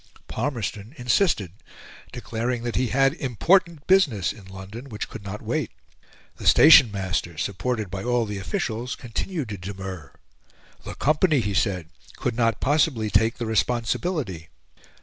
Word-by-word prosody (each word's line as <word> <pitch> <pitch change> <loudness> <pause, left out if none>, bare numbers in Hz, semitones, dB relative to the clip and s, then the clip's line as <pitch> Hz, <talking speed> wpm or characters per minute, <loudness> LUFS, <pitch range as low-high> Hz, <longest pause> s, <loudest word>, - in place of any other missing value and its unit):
Palmerston 115 -2 -4
insisted 120 - +1 0.6
declaring 120 0 -3
that 120 -1 -3
he 130 0 +1
had 135 +3 +3
important 160 - +1
business 150 - +3
in 105 -4 -14
London, 95 +7 -9
which 105 -2 -5
could 110 - -9
not 100 +2 -7
wait. - - -1 0.7
The - - -4
station 150 -6 +8
master 90 -4 -3
supported 105 +2 -2
by 95 0 -4
all 120 -1 +1
the 105 -2 -5
officials, 110 +7 -3
continued 135 - -4
to 100 -3 -6
demur 95 -5 -7 0.7
the - - -7
company, 155 +1 +2
he 105 -3 -2
said, 95 -5 0 0.3
could 125 -3 -2
not 115 -2 +1
possibly 135 -7 +1
take 110 +3 +2
the 120 - -3
responsibility. 115 - -1
115 Hz, 140 wpm, -24 LUFS, 100-130 Hz, 0.7 s, station